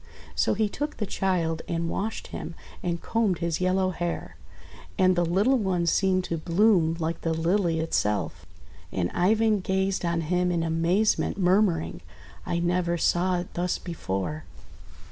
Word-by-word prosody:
So - - +1
he 215 +1 +2
took 295 +8 -4
the 210 - -1
child 175 -5 -1
and 170 0 -1
washed 215 +6 -3
him, 170 - -6 0.3
and 170 -2 -2
combed 215 -2 0
his 170 +1 -2
yellow 185 +1 +2
hair; 175 -1 -4 0.6
and 185 -2 +4
the 175 - +2
little 200 +10 +2
one 185 -4 0
seemed 185 +2 +2
to 165 -2 -3
bloom 170 -1 +3
like 165 0 -3
the 165 -1 0
Lily 170 0 +1
itself. 105 - -1 0.5
And 90 -2 -1
Ivan 215 +3 +2
gazed 190 +1 0
on 170 -1 0
him 180 +2 +1
in 170 -2 0
amazement, 165 +6 +1
murmuring, 185 -3 +2 0.5
!<I 170 - 0
never 175 0 +1
saw 180 +2 +2
it 175 - -10
thus 180 +1 -1
before!' 150 - -4
175 Hz, 150 wpm, -26 LUFS, 165-190 Hz, 0.6 s, and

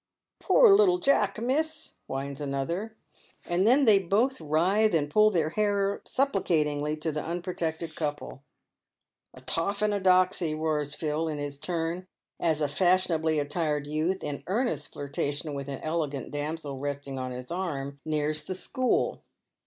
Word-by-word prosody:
"Poor 470 -5 +6
little 385 -3 +5
Jack, 240 - +2
miss," 310 +6 -2
whines 140 +1 -4
another; 170 +11 -3 0.5
and 180 +4 +1
then 270 +4 +5
they 210 -4 +6
both 210 +8 +1
writhe 180 +7 +2
and 145 -2 0
pull 215 +3 +6
their 165 -6 +1
hair 200 0 0
supplicatingly 155 - 0
to 160 +1 -1
the 150 0 -3
unprotected 170 -2 -3
couple. 150 -3 -4 0.9
"A 130 - -13
toff 165 +11 -1
and 210 -1 +2
a 205 - 0
doxy," 185 -3 +3
roars 150 -2 -1
Phil, 155 +1 -1
in 155 -2 -3
his 145 -1 -5
turn, 170 +3 -3 0.3
as 160 -2 +1
a 150 - +2
fashionably 165 -1 +2
attired 150 0 -1
youth, 155 +6 -1
in 145 -1 -4
earnest 235 +7 -1
flirtation 145 +1 -3
with 140 -1 -5
an 140 -2 -5
elegant 155 -4 -2
damsel 145 -1 -4
resting 140 -1 -4
on 130 0 -3
his 125 +3 -7
arm, 140 -6 -3
nears 155 0 -1
the 185 +4 -4
"school." 255 +7 0
160 Hz, 150 wpm, -28 LUFS, 145-195 Hz, 0.9 s, Poor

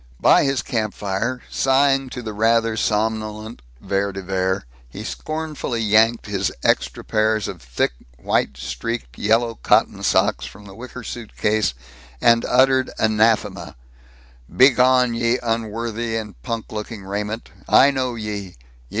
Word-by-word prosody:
By - - +5
his 135 -1 0
campfire, 110 +2 -2
sighing 135 0 +2
to 125 -1 -7
the 110 -1 -5
rather 115 +1 +2
somnolent 110 +1 -2 0.2
Vere 100 0 -1
de 95 0 -7
Vere, 95 -3 -1 0.2
he - - -8
scornfully 155 -6 -4
yanked 110 +2 +3
his 100 -2 -1
extra - - +1
pairs 110 -1 +1
of 90 -5 -7
thick, - - -1 0.3
white 65 +2 0
streaked, - - -5
yellow 115 +1 +1
cotton - - +2
socks - - +1
from 105 - -13
the 100 - -11
wicker 125 +3 -9
suitcase, 110 - -1 0.4
and 115 - +4
uttered 130 +1 +3
anathema: 110 0 +1 0.7
"Begone, 125 -1 +4
ye 115 +1 +1
unworthy 115 0 -2
and 105 - -6
punk 115 - -5
looking 105 -1 -6
raiment. 105 +3 -4 0.2
I 140 +2 +6
know 130 -3 -2
ye! 105 -4 -5
110 Hz, 130 wpm, -21 LUFS, 105-120 Hz, 0.7 s, I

